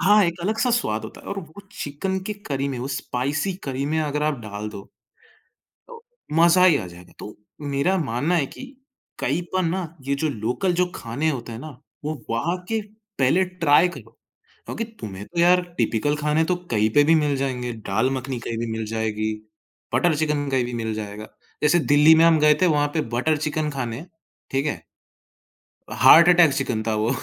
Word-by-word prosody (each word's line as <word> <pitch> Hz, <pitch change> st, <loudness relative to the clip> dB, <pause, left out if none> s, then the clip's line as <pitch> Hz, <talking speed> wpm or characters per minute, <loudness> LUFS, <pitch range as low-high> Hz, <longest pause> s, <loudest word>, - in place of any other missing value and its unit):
हाँ, 205 Hz, +3 st, +5 dB
एक 170 Hz, +1 st, -2 dB
अलग-सा 220 Hz, +6 st, 0 dB
स्वाद 110 Hz, -, 0 dB
होता 110 Hz, -, -10 dB
है -, -, -17 dB
और 200 Hz, -, -4 dB
वो 165 Hz, +1 st, -10 dB
चिकन 190 Hz, +6 st, -3 dB
की 210 Hz, -, -2 dB, 0.2 s
करी 140 Hz, 0 st, -1 dB
में, 130 Hz, -3 st, -4 dB
वो 130 Hz, -, -4 dB
स्पाइसी 140 Hz, +6 st, -2 dB
करी 135 Hz, 0 st, -3 dB
में 160 Hz, +2 st, 0 dB
अगर 150 Hz, -1 st, -2 dB
आप 150 Hz, -3 st, 0 dB
डाल 105 Hz, 0 st, -6 dB
दो, 105 Hz, -2 st, -8 dB, 1.1 s
तो 470 Hz, -1 st, -13 dB, 0.3 s
मज़ा 170 Hz, +3 st, +5 dB
ही 170 Hz, -5 st, +6 dB
आ 95 Hz, -, -4 dB
जाएगा। 90 Hz, 0 st, -14 dB
तो 105 Hz, -, -9 dB, 0.4 s
मेरा 180 Hz, +8 st, +2 dB
मानना 145 Hz, +3 st, -1 dB
है 145 Hz, -5 st, +1 dB
कि 265 Hz, -, -10 dB, 0.5 s
कहीं 150 Hz, +7 st, -1 dB
पर 185 Hz, 0 st, +1 dB
ना 180 Hz, +3 st, -1 dB, 0.2 s
ये 140 Hz, -, +1 dB
जो 155 Hz, +3 st, -1 dB
लोकल 125 Hz, -, -1 dB
जो 180 Hz, +1 st, +2 dB
खाने 135 Hz, +8 st, -2 dB
होते 125 Hz, -5 st, -5 dB
हैं 110 Hz, -, -7 dB
ना, 155 Hz, +5 st, -8 dB, 0.3 s
वो 155 Hz, -, -2 dB, 0.2 s
वहाँ 160 Hz, +11 st, 0 dB
के 225 Hz, 0 st, 0 dB, 0.4 s
पहले 140 Hz, +8 st, +3 dB
ट्राई 175 Hz, -2 st, +3 dB
करो। 175 Hz, -, -12 dB, 0.5 s
क्योंकि 230 Hz, -, -4 dB, 0.2 s
तुम्हें 100 Hz, -2 st, -7 dB
तो 170 Hz, +7 st, -5 dB
यार 180 Hz, +1 st, +5 dB, 0.2 s
टिपिकल 120 Hz, +6 st, +1 dB
खाने 150 Hz, +1 st, +1 dB
तो 180 Hz, -, +1 dB, 0.2 s
कहीं 110 Hz, -1 st, +2 dB
पे 145 Hz, -, +6 dB
भी 160 Hz, +2 st, +4 dB
मिल 150 Hz, -2 st, +1 dB
जाएँगे, 125 Hz, -3 st, -2 dB
दाल 110 Hz, +3 st, -1 dB
मखनी 130 Hz, -1 st, -5 dB
कहीं 115 Hz, -1 st, -5 dB
भी 115 Hz, -1 st, -3 dB
मिल 110 Hz, 0 st, -3 dB
जाएगी, 110 Hz, -1 st, -2 dB, 0.6 s
बटर 175 Hz, -3 st, +3 dB
चिकन 150 Hz, -1 st, -1 dB
कहीं 130 Hz, -2 st, +1 dB
भी 120 Hz, -, -6 dB
मिल 110 Hz, -2 st, -2 dB
जाएगा। 105 Hz, 0 st, -6 dB, 0.4 s
जैसे 150 Hz, +4 st, +4 dB
दिल्ली 150 Hz, +1 st, +6 dB
में 165 Hz, -, +5 dB
हम 165 Hz, -1 st, +5 dB
गए 150 Hz, 0 st, +6 dB
थे 185 Hz, -, +5 dB
वहाँ 145 Hz, -3 st, +2 dB
पे 160 Hz, -, +1 dB
बटर 155 Hz, +5 st, +1 dB
चिकन 155 Hz, 0 st, -2 dB
खाने, 130 Hz, +1 st, -4 dB, 0.5 s
ठीक 135 Hz, +2 st, 0 dB
है? 150 Hz, -, -2 dB, 1.1 s
हार्ट 170 Hz, +2 st, +7 dB
अटैक 175 Hz, -4 st, +6 dB
चिकन 120 Hz, -5 st, -1 dB
था 110 Hz, -, +1 dB
वो। 115 Hz, +5 st, +1 dB
145 Hz, 195 wpm, -23 LUFS, 120-170 Hz, 1.1 s, हार्ट